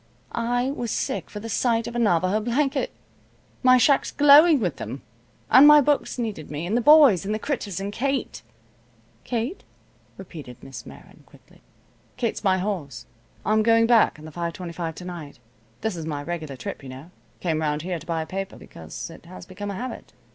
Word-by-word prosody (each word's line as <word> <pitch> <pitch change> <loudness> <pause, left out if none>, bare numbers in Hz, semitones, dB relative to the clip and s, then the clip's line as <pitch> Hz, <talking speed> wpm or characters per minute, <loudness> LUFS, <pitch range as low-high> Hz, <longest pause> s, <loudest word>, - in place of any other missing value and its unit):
I 245 +2 -1
was 240 -4 -4
sick - - -3
for 210 - -7
the 225 - -7
sight 230 +1 +1
of 235 - -7
a - - 0
Navajo 185 -1 +2
blanket. 260 +5 0 0.7
My 255 -1 +6
shack's 270 +3 +3
glowing 295 +2 +7
with 180 - -2
them. 135 - -7 0.5
And 275 +3 +9
my 300 0 +9
books 290 -1 +1
needed 215 -11 -4
me, 150 +3 -4
and 200 +6 -1
the 240 - +2
boys, 285 - +7
and 210 +2 -2
the - - -1
critters, 215 - -3
and 200 +1 -4
Kate." 275 +4 -2 0.8
"Kate?" 245 - -3 0.5
repeated 155 -10 -10
Miss 135 - -9
Meron, - - -14
quickly. - - -21 0.6
"Kate's 235 -3 -2
my 190 -2 +3
horse. 160 - -4 0.4
I'm 215 +1 +3
going 230 +1 +4
back 230 -7 +4
on 155 - -12
the 160 - -9
5:25 170 0 -5
to 180 - -9
night. 170 -7 -8 0.4
This 220 -3 -2
is 160 -2 -6
my 145 -2 -4
regular 160 -4 -5
trip, 125 - -7
you 135 - -10
know. 135 +7 -11 0.3
I - - -23
came 160 -3 0
around 150 0 -1
here 180 -1 -3
to 165 - -15
buy 165 -2 -1
a - - -9
paper, 195 +3 -5
because 80 -1 -9
it - - -14
has 90 - -11
become 205 0 -7
a 200 - -4
habit. 250 +5 -7
200 Hz, 190 wpm, -24 LUFS, 165-240 Hz, 0.8 s, And